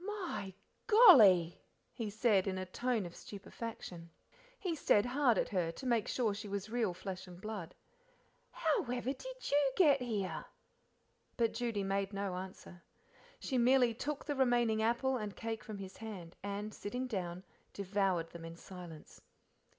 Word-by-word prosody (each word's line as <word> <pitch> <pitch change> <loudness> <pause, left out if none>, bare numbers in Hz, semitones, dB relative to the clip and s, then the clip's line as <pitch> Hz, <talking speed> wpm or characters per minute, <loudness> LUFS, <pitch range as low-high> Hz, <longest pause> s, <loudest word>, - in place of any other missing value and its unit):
"My 370 - -4 0.3
golly!" 225 - +8 0.3
he 225 -3 -4
said, 210 -2 +2
in 190 -1 -1
a 185 - -3
tone 230 +2 -1
of 175 - -9
stupefaction. 195 -4 -8 0.5
He 365 -7 -2
stared 210 -8 +3
hard 250 -3 +3
at - - 0
her 175 -4 0
to 260 - -9
make 235 -4 +1
sure 230 -5 +1
she 210 +1 -6
was 200 +1 -4
real 225 -7 0
flesh 190 0 -6
and 175 -1 -11
blood. 195 -4 -6 0.7
"However 265 - 0
did - - -7
you 285 -1 +4
get 290 -7 +5
here?" 210 -6 -2 0.9
But 230 -2 +2
Judy 230 -5 -1
made 195 +1 -1
no 200 -1 -2
answer. 185 -1 -8 0.6
She 260 -3 -1
merely 245 -1 +5
took 285 +5 -4
the 295 - -1
remaining 240 -4 +3
apple 240 +4 +1
and 210 -4 -5
cake 225 0 -4
from 215 -2 -7
his 190 -1 -8
hand, 190 -7 -8
and, 200 +2 -4
sitting 245 +7 -4
down, 185 -6 -4 0.3
devoured 190 -4 0
them 170 -1 -9
in 165 0 -8
silence. 175 -4 -11
215 Hz, 155 wpm, -34 LUFS, 190-250 Hz, 0.9 s, golly